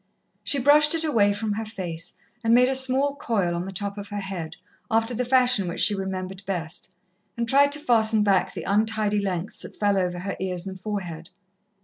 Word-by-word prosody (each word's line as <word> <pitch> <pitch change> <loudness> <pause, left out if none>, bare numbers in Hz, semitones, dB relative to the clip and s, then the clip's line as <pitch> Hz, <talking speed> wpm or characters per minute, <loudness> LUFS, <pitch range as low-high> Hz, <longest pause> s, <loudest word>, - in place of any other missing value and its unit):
She 285 - +3
brushed 295 +4 +5
it 325 - +2
away 225 -10 +3
from 210 +1 -3
her 215 +2 -2
face, 180 -7 -5 0.3
and 230 +1 +4
made 250 +1 +5
a - - +1
small 265 +2 +3
coil 200 -10 -1
on 170 +1 -3
the - - -5
top 200 +2 -5
of 200 - -8
her 205 - -4
head, 190 -5 -6 0.3
after 225 +2 +1
the 245 +2 -1
fashion 250 -5 +3
which 170 - -4
she 210 - +3
remembered 190 -1 -5
best, 175 0 -4 0.4
and 235 0 -1
tried 280 +3 +4
to 295 - +1
fasten 220 -5 +3
back 195 -2 +2
the - - -5
untidy 210 0 +1
lengths 190 -1 -4
that - - -8
fell 205 -2 +2
over 180 -1 -1
her 190 +3 -4
ears 180 -1 -3
and 190 -1 -8
forehead. 175 -6 -5
205 Hz, 205 wpm, -24 LUFS, 190-235 Hz, 0.4 s, brushed